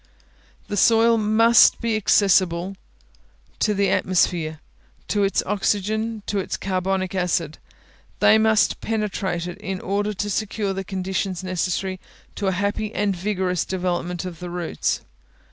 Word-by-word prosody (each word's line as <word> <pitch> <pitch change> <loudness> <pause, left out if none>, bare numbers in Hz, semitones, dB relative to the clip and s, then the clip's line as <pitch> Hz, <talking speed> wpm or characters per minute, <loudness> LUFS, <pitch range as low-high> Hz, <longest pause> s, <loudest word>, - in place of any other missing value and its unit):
The 205 - -3
soil 230 +2 +5
must 220 +2 +5
be 230 -1 0
accessible 190 -3 +2 0.8
to 210 - +1
the 200 0 +2
atmosphere, 170 -4 +1 0.5
to 205 - +1
its 195 - +1
oxygen, 215 +2 -1
to 205 - -1
its 190 - -3
carbonic 190 0 -1
acid; 175 -4 -1 0.6
these 220 - +6
must 220 -1 +2
penetrate 200 -5 -2
it, 175 - -7
in 190 -1 -4
order 205 +2 -2
to 205 +2 -3
secure 205 -1 -2
the 195 0 -4
conditions 190 0 -3
necessary 185 +1 -2 0.3
to 200 - -3
a - - +3
happy 205 +3 -2
and 205 -2 0
vigorous 185 -2 -1
development 180 -1 -3
of 175 -3 -7
the 180 - -6
roots. 175 -1 -2
195 Hz, 135 wpm, -23 LUFS, 180-210 Hz, 0.8 s, these